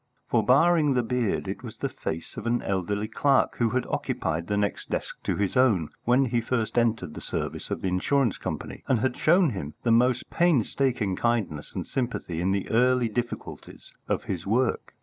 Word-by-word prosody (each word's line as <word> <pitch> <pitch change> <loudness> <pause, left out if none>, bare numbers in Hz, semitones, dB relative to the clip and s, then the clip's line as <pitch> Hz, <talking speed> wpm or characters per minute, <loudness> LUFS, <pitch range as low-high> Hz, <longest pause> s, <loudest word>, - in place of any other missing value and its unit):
For, 115 -2 +2
barring 145 +4 +4
the 125 - +2
beard, 120 -2 -1
it - - -4
was - - -9
the - - -1
face 80 +1 -6
of 110 - -5
an 120 +1 +1
elderly 100 +2 -1
clerk 135 +4 +2
who 115 -2 +2
had 125 +2 0
occupied 85 +2 -2
the 105 - 0
next 100 -1 -2
desk - - -4
to - - 0
his 100 -2 -1
own 110 -12 +3 0.2
when 125 +3 +4
he 120 -1 0
first 115 -1 -2
entered 115 -9 +1
the - - -8
service - - -4
of - - -3
the - - -1
insurance 115 +6 +1
company, - - -5
and 120 -5 +2
had 130 0 0
shown 170 -1 +4
him 75 -8 -6
the 115 - +2
most 125 +2 +3
painstaking 130 - +1
kindness 105 -10 -1
and - - -3
sympathy 120 -10 -3
in 90 - +1
the 100 0 -1
early 125 +1 +3
difficulties 120 +2 -6
of - - -1
his 90 -1 -4
work. 120 +4 0
115 Hz, 190 wpm, -26 LUFS, 100-130 Hz, 0.2 s, barring